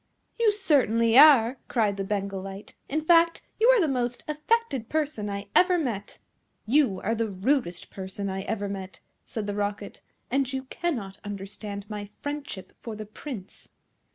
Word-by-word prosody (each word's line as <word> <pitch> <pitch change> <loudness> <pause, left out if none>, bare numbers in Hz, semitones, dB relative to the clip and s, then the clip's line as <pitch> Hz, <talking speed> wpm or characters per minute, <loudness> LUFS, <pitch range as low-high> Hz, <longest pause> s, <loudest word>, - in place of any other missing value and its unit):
"You 455 -2 +5
certainly 250 - +3
are!" 265 -4 +8
cried 215 -5 +1
the 195 - -3
Bengal 195 -1 -2
Light. 195 +1 -9 0.2
"In 310 +3 0
fact, 335 +1 +4 0.2
you 450 - +5
are - - +7
the 335 - +3
most 245 -3 -1
affected 300 - 0
person 295 -9 -1
I 200 0 -5
ever 365 0 +5
met." 235 - -3 0.5
"You 235 -5 +3
are 225 - 0
the 230 -1 -1
rudest 195 -2 -1
person 190 +1 -5
I 190 0 -3
ever 205 0 -2
met," 195 -1 -6 0.3
said 220 -2 -4
the 205 - -2
Rocket, 205 0 -3 0.3
"and 270 0 +1
you 265 -1 -3
cannot 250 - -3
understand 200 0 -6
my 210 -1 -5
friendship 285 -9 -6
for 225 -2 -6
the 215 0 -6
Prince." 215 -2 -9
225 Hz, 160 wpm, -27 LUFS, 200-290 Hz, 0.5 s, are